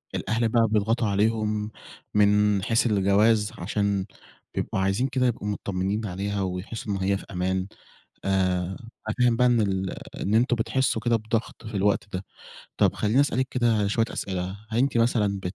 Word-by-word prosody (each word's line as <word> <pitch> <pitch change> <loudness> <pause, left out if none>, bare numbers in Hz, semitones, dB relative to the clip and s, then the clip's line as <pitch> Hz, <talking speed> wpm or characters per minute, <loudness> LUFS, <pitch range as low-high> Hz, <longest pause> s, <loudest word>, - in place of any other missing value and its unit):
الأهل 115 +1 0
بقى 115 0 +3
بيضغطوا 110 +2 +1
عليهم 105 +1 0 0.4
من 105 -1 +3
حيث 115 +3 +2
الجواز، 105 +1 +3
عشان 100 +1 0 0.5
بيبقوا - - -2
عايزين 95 +7 +1
كده 130 -1 +1
يبقوا 105 -3 -2
متطمّنين 100 +1 -2
عليها، 100 +2 -3
ويحسّوا 95 +3 -4
إن - - -1
هي 100 0 +2
في - - -11
أمان. 95 +1 -1 0.6
آآ 95 -2 +2 0.5
أنا - - -2
فاهم 120 -2 +4
بقى 125 0 +4
إن 120 -2 +3
ال 95 -2 -1 0.3
إن 105 +3 +1
أنتم 120 +2 +3
بتحسّوا 115 0 0
كده 120 -1 +3
بضغط 110 +1 -3
في 105 -2 -4
الوقت 100 +1 +1
ده. 95 +1 -4 0.5
طب - - +3
خلّيني 110 +6 +2
أسألِك 130 -2 +1
كده 115 -5 +2
شوية 115 +2 +2
أسئلة، 95 -2 -3 0.3
هل 110 - 0
أنتِ 135 -1 +2
مثلًا 105 -4 +2
بت 90 +2 -4
105 Hz, 165 wpm, -25 LUFS, 100-115 Hz, 0.6 s, فاهم